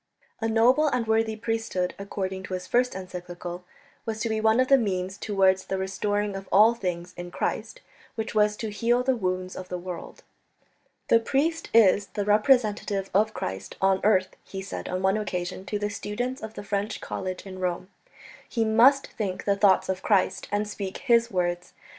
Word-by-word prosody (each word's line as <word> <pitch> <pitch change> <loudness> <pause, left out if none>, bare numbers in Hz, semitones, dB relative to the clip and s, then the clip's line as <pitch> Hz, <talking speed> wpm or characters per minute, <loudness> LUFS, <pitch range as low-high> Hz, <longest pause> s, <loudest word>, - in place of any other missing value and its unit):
A 225 - -1
noble 245 +7 +4
and 250 -5 0
worthy 220 0 +1
priesthood, 225 -5 -2
according 190 -1 -4
to 185 - -4
his 180 0 -6
first 250 +3 +1
encyclical, 180 -1 -7 0.4
was 220 -1 -4
to 230 - -1
be 220 0 0
one 220 +2 +4
of 255 - +3
the 275 0 +6
means 190 -4 -2
towards 190 -2 +2
that 190 - -2
restoring 205 +2 -1
of 195 0 -7
all 215 +4 +7
things 180 -5 -4
in 175 0 -6
Christ - - -3 0.3
"which 220 0 -4
was 210 -1 +3
to 220 -2 -4
heal 235 +4 +1
the 260 0 +2
wounds 185 -3 -2
of 185 -1 -8
the 180 - -3
world." 175 -1 -8 0.9
"The 230 - +6
priest 300 +8 0
is 205 -2 +5
the 205 -2 -3
representative 210 -3 +2
of 215 +3 +2
Christ 95 0 -5
on 190 0 +2
earth," 190 -3 +2
he 190 0 -7
said 195 - -6
on 185 +1 -2
one 190 +2 +3
occasion 185 -2 -4
to 210 - -1
the 205 0 -2
students 245 +6 -4
of 220 0 -7
the - - -6
French 205 +1 -2
College 185 0 -5
in 185 -1 -8
Rome; 180 0 -2 0.6
"he 230 -2 0
must 245 +6 +5
think 195 -4 -4
the 200 - +3
thoughts 200 -1 +4
of 190 0 -2
Christ 200 -4 +1
and 205 +1 0
speak 200 -2 -5
His 235 -3 +3
words. 175 -2 -2
205 Hz, 185 wpm, -26 LUFS, 185-225 Hz, 0.9 s, all